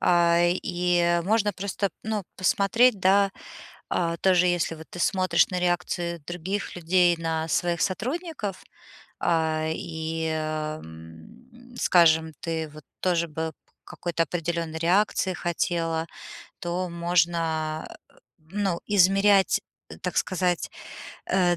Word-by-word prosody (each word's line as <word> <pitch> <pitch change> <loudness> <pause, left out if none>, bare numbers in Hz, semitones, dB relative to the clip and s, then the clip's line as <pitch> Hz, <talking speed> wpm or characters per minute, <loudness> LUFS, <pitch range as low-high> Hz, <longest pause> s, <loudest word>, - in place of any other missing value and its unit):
а, 170 -1 +4
и 175 -1 +1
можно 210 0 +2
просто 200 +1 -2
ну, 215 -3 -2
посмотреть, 205 +5 +3
да, 195 +1 +4 0.6
а, 170 -1 0
тоже 180 -1 +4
если 175 -2 +1
вот 160 0 -11
ты 175 - -9
смотришь 185 +1 +3
на 180 - -2
реакции 175 -1 -1
других 180 +4 -4
людей 175 0 +3
на 160 -1 -1
своих 170 +2 0
сотрудников, 245 - -3 0.6
а, 160 -1 +1
и 160 -1 -4
м 155 - -6 0.2
м - - -14
скажем, 160 -4 +4
ты 160 -2 -3
вот 150 0 -13 0.2
тоже 170 -2 +1
бы 160 +1 -4 0.3
к - - -16
какой-то 170 -1 -1
определённой 170 -1 -3
реакции 190 +2 +2
хотела, 165 -1 -1 0.5
то 175 +1 -2
можно, 165 -2 0 0.2
э - - -27 0.3
ну, 180 +2 -2
измерять, 195 0 +4 0.4
так - - -3
сказать, 180 -2 0 0.6
э, 180 -2 +2
175 Hz, 115 wpm, -26 LUFS, 160-185 Hz, 0.6 s, а